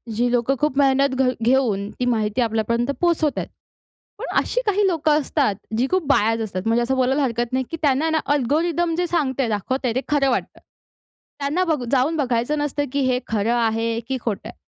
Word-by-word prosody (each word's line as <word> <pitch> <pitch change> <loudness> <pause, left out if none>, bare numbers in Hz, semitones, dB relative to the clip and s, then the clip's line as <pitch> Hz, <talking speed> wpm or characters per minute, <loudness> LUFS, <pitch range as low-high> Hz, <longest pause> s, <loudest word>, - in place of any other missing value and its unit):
जी 240 +2 +1
लोकं 245 +2 +1
खूप 295 -3 0
मेहनत 275 -1 +3
घ 260 -1 +2 0.2
घेऊन 230 -6 +2
ती 250 - 0
माहिती, 225 -1 0
आपल्यापर्यंत 235 +2 0
पोहोचवत 335 -4 +1
आहेत. - - -3 0.7
पण - - -4
अशी - - -1
काही 410 -1 +2
लोकं 315 -4 +2
असतात, 275 -7 0 0.2
जी 250 +3 +1
खूप 370 -1 +2
बायज 225 -4 +2
असतात. 195 -4 -3
म्हणजे 230 +1 +2
असं 265 +3 0
बोलायला 265 +2 +1
हरकत 240 -2 -1
नाही, 260 0 0
की 330 - -3
त्यांना 290 +1 +2
ना 320 0 +1
अल्गोरिदम 325 +5 0
जे 355 0 0
सांगतय 275 -7 0
दाखवतंय 240 +4 -1
ते 260 - +1
खरं 285 -2 +2
वाटतं. 245 - -2 0.8
त्यांना 290 +6 0
बघू 310 -8 -1
जाऊन 275 +4 +2
बघायचं 250 +1 0
नसतं, 290 0 -1
की 285 - 0
हे 250 -1 +1
खरं 220 +1 0
आहे 230 0 0
की 265 - -1
खोटं 220 -4 -3
आहे? - - -13
265 Hz, 190 wpm, -22 LUFS, 235-295 Hz, 0.8 s, मेहनत